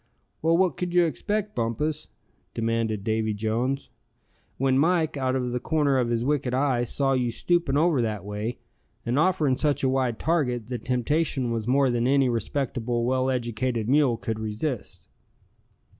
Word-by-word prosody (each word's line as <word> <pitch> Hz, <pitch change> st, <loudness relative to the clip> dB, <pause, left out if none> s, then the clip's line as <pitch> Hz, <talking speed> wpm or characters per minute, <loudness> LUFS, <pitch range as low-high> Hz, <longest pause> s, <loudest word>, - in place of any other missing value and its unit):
"Well, 165 Hz, +1 st, +3 dB
what 180 Hz, -4 st, +2 dB
could 180 Hz, -1 st, -3 dB
you 175 Hz, -1 st, +6 dB
expect, 210 Hz, +6 st, -2 dB
Bumpus?" 145 Hz, +7 st, -2 dB, 0.5 s
demanded 115 Hz, -2 st, -1 dB
Davy 110 Hz, 0 st, 0 dB
Jones. 115 Hz, +6 st, -2 dB, 0.7 s
"When 135 Hz, 0 st, +2 dB
Mike, 160 Hz, +2 st, +2 dB
out 130 Hz, -2 st, 0 dB
of 125 Hz, -2 st, -1 dB
the 125 Hz, -, -1 dB
corner 145 Hz, -2 st, +1 dB
of 120 Hz, -2 st, 0 dB
his 120 Hz, 0 st, 0 dB
wicked 135 Hz, -3 st, 0 dB
eye, 130 Hz, -3 st, +1 dB
saw 135 Hz, +2 st, +1 dB
you 125 Hz, -2 st, +1 dB
stooping 160 Hz, +2 st, 0 dB
over 155 Hz, -4 st, +3 dB
that 105 Hz, -4 st, -3 dB
way, 105 Hz, +3 st, -4 dB, 0.5 s
and 120 Hz, +4 st, +1 dB
offering 155 Hz, -7 st, +2 dB
such 145 Hz, -3 st, 0 dB
a 130 Hz, -, +3 dB
wide 130 Hz, -3 st, 0 dB
target, 125 Hz, -9 st, 0 dB
the 125 Hz, -2 st, -3 dB
temptation 130 Hz, +2 st, 0 dB
was 115 Hz, -1 st, -2 dB
more 135 Hz, 0 st, +3 dB
than 120 Hz, 0 st, +1 dB
any 135 Hz, -1 st, +3 dB
respectable, 120 Hz, 0 st, -1 dB
well 130 Hz, +1 st, +1 dB
educated 120 Hz, -2 st, -1 dB
mule 135 Hz, -3 st, +3 dB
could 110 Hz, -1 st, -4 dB
resist." 110 Hz, +4 st, -4 dB
130 Hz, 160 wpm, -26 LUFS, 115-145 Hz, 0.7 s, you